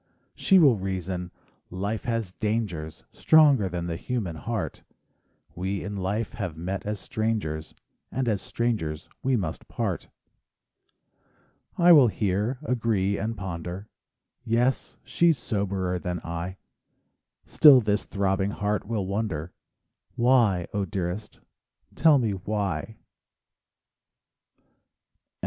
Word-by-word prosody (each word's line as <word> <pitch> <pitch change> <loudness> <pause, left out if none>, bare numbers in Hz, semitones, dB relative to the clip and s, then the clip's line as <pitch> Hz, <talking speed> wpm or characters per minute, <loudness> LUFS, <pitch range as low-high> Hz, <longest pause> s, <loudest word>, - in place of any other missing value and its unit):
She 195 - +4
will 140 -10 +6
reason: 95 -2 -3 0.4
"Life 100 +4 -3
has 115 -5 -2
dangers, 95 -7 -3
Stronger 145 -10 +5
than 85 -1 -4
the 85 -1 -3
human 110 -9 -3
heart; 105 +7 -4 0.7
We 95 +2 -3
in 100 +2 -5
life 100 +3 -2
have 90 -8 -5
met 95 +4 -4
as 105 -1 -2
strangers, 105 -10 -3 0.4
And 130 -1 -1
as 105 -5 0
strangers 95 -11 -2
we 130 0 +1
must 85 -6 -4
part." - - -3 1.7
I 175 0 +6
will 145 -7 +8
hear, 105 +3 -1
agree, 110 -7 0
and 110 +2 -3
ponder: 90 +2 -6 0.5
"Yes, 120 +3 0
she's 170 -3 +2
soberer 100 -6 -2
than 90 -1 -3
I;" 85 +3 -5 0.9
Still 145 -4 +8
this 105 -2 0
throbbing 95 -1 0
heart 105 0 -2
will 105 -4 -1
wonder, 95 -5 -3 0.6
"Why, 120 -8 +3
0 100 -1 -1
dearest, 95 +3 -4 0.5
tell 155 -2 +5
me 115 -5 +1
why?... 100 0 -3
100 Hz, 110 wpm, -26 LUFS, 90-115 Hz, 1.7 s, will